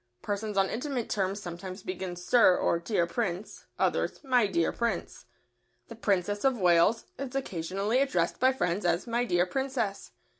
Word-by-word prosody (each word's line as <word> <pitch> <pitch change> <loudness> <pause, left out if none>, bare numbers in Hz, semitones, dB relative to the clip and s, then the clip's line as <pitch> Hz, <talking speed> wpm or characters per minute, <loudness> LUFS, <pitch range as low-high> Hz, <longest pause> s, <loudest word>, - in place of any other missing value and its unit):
Persons 205 0 -3
on 195 0 +4
intimate 250 +1 -3
terms 195 0 0
sometimes 185 +1 -7
begin 185 -1 -4
"Sir" 180 +1 +4
or 170 - +1
"Dear 170 0 0
Prince," 190 +1 -4
others - - 0
"My 250 -5 +3
dear 170 -4 +1
Prince." 235 0 -3 0.6
The 230 - -8
Princess 205 -2 0
of 265 -2 +3
Wales 180 +3 +3
is 270 -1 -5
occasionally 200 0 -1
addressed 180 -12 0
by 260 +1 +5
friends 185 -6 -1
as 175 0 +1
"My 240 +1 0
dear 175 -5 +2
Princess." 245 -3 -3
200 Hz, 155 wpm, -29 LUFS, 180-240 Hz, 0.6 s, by